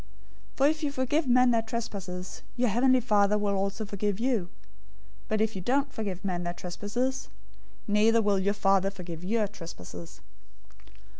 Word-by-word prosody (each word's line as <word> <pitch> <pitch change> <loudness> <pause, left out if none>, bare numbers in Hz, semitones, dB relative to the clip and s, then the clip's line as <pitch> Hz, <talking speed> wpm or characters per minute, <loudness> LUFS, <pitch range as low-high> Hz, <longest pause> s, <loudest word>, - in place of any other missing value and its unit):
"}' - - -26
006:014 - - -30
"For 275 - +5
if 310 +1 0
you 290 - 0
forgive 280 +3 0
men 250 0 +5
their 230 -1 +3
trespasses, 195 -5 -5 0.2
your 245 -1 +2
heavenly 255 +4 +4
Father 210 -3 +3
will 205 -1 0
also 200 +3 -1
forgive 200 0 -2
you. 235 -6 +1 0.8
006:015 - - -26
But 215 -1 0
if 220 -1 +1
you 190 - -4
don't 275 +7 +1
forgive 200 -3 -4
men 180 -2 -1
their 175 0 -3
trespasses, 240 +10 -3 0.6
neither 215 +2 +4
will 205 -3 +2
your 200 +2 +1
Father 195 -1 +3
forgive 175 -4 -8
your 215 +2 +1
trespasses. 90 - -10
210 Hz, 170 wpm, -28 LUFS, 195-245 Hz, 0.8 s, For